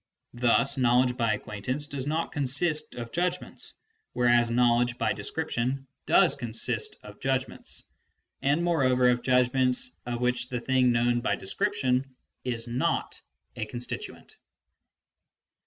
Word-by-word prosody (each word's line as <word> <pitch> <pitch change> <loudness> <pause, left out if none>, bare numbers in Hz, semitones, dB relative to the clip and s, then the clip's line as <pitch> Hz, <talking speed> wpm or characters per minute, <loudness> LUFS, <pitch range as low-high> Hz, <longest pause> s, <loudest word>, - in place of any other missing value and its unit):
Thus 125 +3 +2
knowledge 125 0 +3
by 115 -3 +1
ac - - -10
quaintance 125 +8 -4
does 140 -2 -4
not 160 +2 -1
consist 150 +2 0
of 115 -1 -6
judgments, 180 +1 -3 0.4
whereas 120 -1 +3
knowledge 120 0 +2
by - - +1
description 135 -4 -2 0.2
does - - +5
consist 115 -4 -1
of 105 0 -12
judgments, 135 -1 -1 0.6
and 145 +5 +2
moreover 130 -7 +3
of 120 0 +1
judgments 125 0 +2 0.2
of 120 -1 -2
which 125 0 0
the 125 - -2
thing 130 0 +2
known 120 0 +2
by - - +1
description 135 - -1 0.3
is 120 -2 -2
not 120 +2 -1 0.3
a 110 - -4
constituent. 120 +2 -6
125 Hz, 125 wpm, -27 LUFS, 120-135 Hz, 0.6 s, does